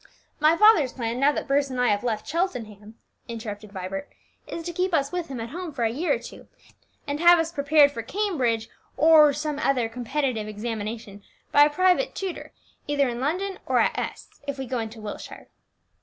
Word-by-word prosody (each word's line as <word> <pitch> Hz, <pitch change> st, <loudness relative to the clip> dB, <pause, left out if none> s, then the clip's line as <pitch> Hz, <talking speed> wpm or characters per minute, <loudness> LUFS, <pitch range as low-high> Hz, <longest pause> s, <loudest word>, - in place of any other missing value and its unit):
"My 310 Hz, +2 st, +4 dB
father's 420 Hz, -, +5 dB
plan, 235 Hz, -1 st, -3 dB
now 280 Hz, +2 st, +4 dB
that 295 Hz, -, -4 dB
Bruce 280 Hz, 0 st, +2 dB
and 255 Hz, -1 st, -4 dB
I 250 Hz, -, +3 dB
have 205 Hz, +1 st, +1 dB
left 230 Hz, -3 st, -2 dB
Cheltenham," 225 Hz, -, -3 dB, 0.3 s
interrupted 215 Hz, -3 st, -7 dB
Vibert, 195 Hz, +5 st, -5 dB, 0.4 s
"is 330 Hz, -, -6 dB
to 345 Hz, +1 st, -5 dB
keep 365 Hz, +1 st, 0 dB
us 280 Hz, -2 st, 0 dB
with 355 Hz, -2 st, -3 dB
him 265 Hz, -3 st, -6 dB
at 225 Hz, +1 st, -5 dB
home 350 Hz, +1 st, -5 dB
for 260 Hz, -5 st, -3 dB
a 225 Hz, -, +2 dB
year 305 Hz, +9 st, 0 dB
or -, -, -2 dB
two, -, -, -12 dB, 0.6 s
and 290 Hz, 0 st, -3 dB
have 345 Hz, +1 st, +7 dB
us 325 Hz, 0 st, -1 dB
prepared 285 Hz, -1 st, +4 dB
for 235 Hz, -, -5 dB
Cambridge 250 Hz, -, -1 dB, 0.3 s
or 305 Hz, 0 st, +7 dB
some 300 Hz, 0 st, -3 dB, 0.3 s
competitive 250 Hz, -2 st, -2 dB
examination 215 Hz, -1 st, -5 dB, 0.3 s
by 290 Hz, -, +7 dB
a -, -, +2 dB
private 370 Hz, +9 st, +2 dB
tutor, 380 Hz, -3 st, -5 dB, 0.4 s
either 285 Hz, -1 st, +2 dB
in 240 Hz, -1 st, -4 dB
London, 365 Hz, +7 st, -2 dB
or -, -, +2 dB
at -, -, +2 dB
S, -, -, -6 dB
if 280 Hz, -1 st, -3 dB
we 265 Hz, -, -4 dB
go 250 Hz, 0 st, -2 dB
into 225 Hz, 0 st, -6 dB
Wiltshire." 210 Hz, -1 st, -8 dB
275 Hz, 190 wpm, -25 LUFS, 230-325 Hz, 0.6 s, have